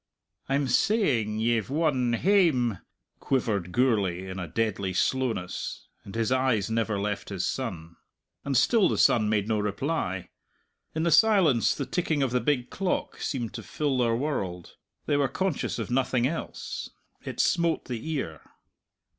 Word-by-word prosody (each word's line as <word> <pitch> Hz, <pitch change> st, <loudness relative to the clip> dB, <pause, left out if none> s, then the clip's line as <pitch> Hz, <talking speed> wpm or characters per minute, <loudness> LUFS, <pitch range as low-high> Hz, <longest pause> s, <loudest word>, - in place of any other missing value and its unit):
"I'm 140 Hz, 0 st, +1 dB
saying... 125 Hz, -, +2 dB
ye've 115 Hz, -2 st, +1 dB
won 135 Hz, -5 st, +1 dB
hame!" 130 Hz, -, +3 dB, 0.4 s
quivered 105 Hz, -9 st, -1 dB
Gourlay 100 Hz, -6 st, +1 dB
in 95 Hz, 0 st, -6 dB
a 90 Hz, -, -4 dB
deadly 100 Hz, 0 st, -1 dB
slowness, 115 Hz, -3 st, -2 dB
and 100 Hz, -, -10 dB
his 115 Hz, +1 st, 0 dB
eyes 130 Hz, -5 st, +1 dB
never 110 Hz, -2 st, 0 dB
left 105 Hz, 0 st, -3 dB
his 95 Hz, -3 st, -2 dB
son. 85 Hz, -10 st, -4 dB, 0.5 s
And 140 Hz, -2 st, 0 dB
still 210 Hz, -, +4 dB
the -, -, -1 dB
son 110 Hz, -3 st, +4 dB
made 105 Hz, -1 st, +1 dB
no 110 Hz, -1 st, +1 dB
reply. 105 Hz, -, -2 dB, 0.7 s
In 160 Hz, -, 0 dB
the 170 Hz, -, +2 dB
silence 160 Hz, -, +4 dB
the 140 Hz, -, -3 dB
ticking 150 Hz, +1 st, 0 dB
of 130 Hz, -, 0 dB
the 125 Hz, 0 st, +1 dB
big 135 Hz, -5 st, 0 dB
clock 190 Hz, -2 st, -2 dB
seemed 120 Hz, -6 st, -3 dB
to -, -, -6 dB
fill 145 Hz, -4 st, -1 dB
their 115 Hz, -2 st, +2 dB
world. 100 Hz, -, -3 dB, 0.3 s
They 145 Hz, -, +1 dB
were 140 Hz, -1 st, +2 dB
conscious 190 Hz, -2 st, -2 dB
of -, -, -4 dB
nothing 125 Hz, -1 st, +1 dB
else. 160 Hz, +5 st, -4 dB, 0.3 s
It -, -, -6 dB
smote 170 Hz, -1 st, +2 dB
the 120 Hz, +4 st, -5 dB
ear. 80 Hz, -, -4 dB
120 Hz, 155 wpm, -27 LUFS, 105-145 Hz, 0.7 s, still